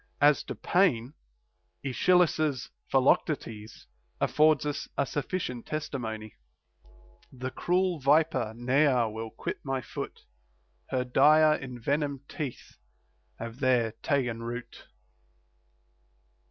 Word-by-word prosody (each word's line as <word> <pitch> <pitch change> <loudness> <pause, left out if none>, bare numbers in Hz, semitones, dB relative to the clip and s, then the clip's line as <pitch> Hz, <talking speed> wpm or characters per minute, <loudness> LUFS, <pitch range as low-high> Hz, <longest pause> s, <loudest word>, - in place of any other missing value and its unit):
As 145 0 +5
to - - -5
pain, 140 -9 +2 0.7
Aeschylus's 155 -1 +2 0.2
Philoctetes 125 -5 0 0.3
affords 155 -1 +3
us 145 -1 -3
a - - +2
sufficient 145 - -3
testimony: 110 -8 -5 0.9
The 130 0 -5
cruel 180 +1 0
viper 140 -5 +2
ne'er 125 0 +3
will 110 +1 -5
quit - - -5
my 135 -2 -2
foot; - - -7 0.7
Her 130 -1 0
dire 150 +5 +5
envenomed 140 +2 -3
teeth 145 -7 -6 0.6
have 115 +2 -7
there 125 -4 +2
ta'en 120 -5 0
root. 120 +1 -7
135 Hz, 95 wpm, -28 LUFS, 120-150 Hz, 0.9 s, As